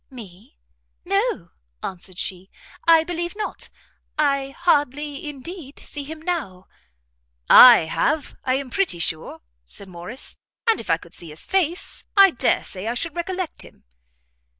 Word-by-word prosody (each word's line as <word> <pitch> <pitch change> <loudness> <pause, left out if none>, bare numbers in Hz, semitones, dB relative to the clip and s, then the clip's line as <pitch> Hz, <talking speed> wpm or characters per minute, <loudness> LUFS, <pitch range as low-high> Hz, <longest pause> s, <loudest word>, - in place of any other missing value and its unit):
"Me? 200 - -13 0.5
no," 395 - 0 0.3
answered 185 0 -7
she, 185 0 -3 0.4
"I 330 -1 +7
believe 345 +2 -4
not, 425 - -4 0.5
I 275 -2 +1
hardly 295 -1 0
indeed, 295 +1 -8
see 290 - -6
him 310 +3 -8
now." 265 - -3 0.9
"I 245 -2 +11
have, 285 - -1
I 255 -1 +1
am 265 -2 -4
pretty 390 - +1
sure," 165 -1 -2 0.2
said 190 - -4
Morrice; 180 +8 -8 0.3
"and 455 - +4
if - - -12
I - - +4
could - - -16
see 170 - -4
his 150 +1 -7
face, 365 -1 0
I 390 -1 +8
dare 250 - +1
say 190 +2 -5
I 235 - -1
should 320 +5 -3
recollect 365 0 -4
him." - - -13
285 Hz, 145 wpm, -22 LUFS, -, 0.9 s, I